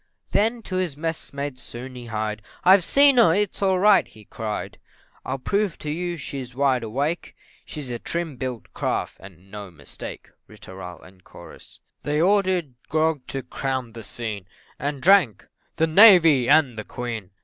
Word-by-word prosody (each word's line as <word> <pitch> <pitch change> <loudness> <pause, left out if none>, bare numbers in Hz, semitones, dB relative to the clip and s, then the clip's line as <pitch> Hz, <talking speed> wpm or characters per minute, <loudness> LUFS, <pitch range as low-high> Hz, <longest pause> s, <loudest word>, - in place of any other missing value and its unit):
Then 225 +2 +1
to 185 - -4
his 175 -6 -2
messmates 145 -4 -5
soon 125 +2 -9
he 125 -1 -9
hied, 110 -1 -3 0.2
"I've 190 0 +6
seen 280 +6 +5
her 170 -9 +6
it's 205 -1 -1
all 190 -1 +2
right," 195 - +5
he 110 -3 -17
cried, 110 0 -5 0.4
"I'll 130 - -3
prove 200 +7 -1
to 150 - -5
you 175 +2 -3
she's 130 -4 -7
wide 135 -2 +2
awake 140 +9 -3 0.3
She's 145 -5 -7
a 120 - -4
trim 170 0 -4
built 125 -2 -6
craft, - - -2
and 95 0 -15
no 105 -1 -8
mistake." 75 -5 -10 0.2
Ri - - -15
tooral, 90 -3 -10 0.6
&c. - - -15 0.2
They 150 +1 -1
ordered 185 -5 +2 0.2
grog 155 -3 0
to 135 -1 -4
crown 130 -1 -4
the 115 - -8
scene, 105 -3 -6 0.3
And 140 -1 -4
drank 175 - +4 0.3
"The 160 - +2
Navy 165 - +7
and 140 -7 +4
the - - -4
Queen!" 115 -6 -6
140 Hz, 160 wpm, -23 LUFS, 120-175 Hz, 0.6 s, Navy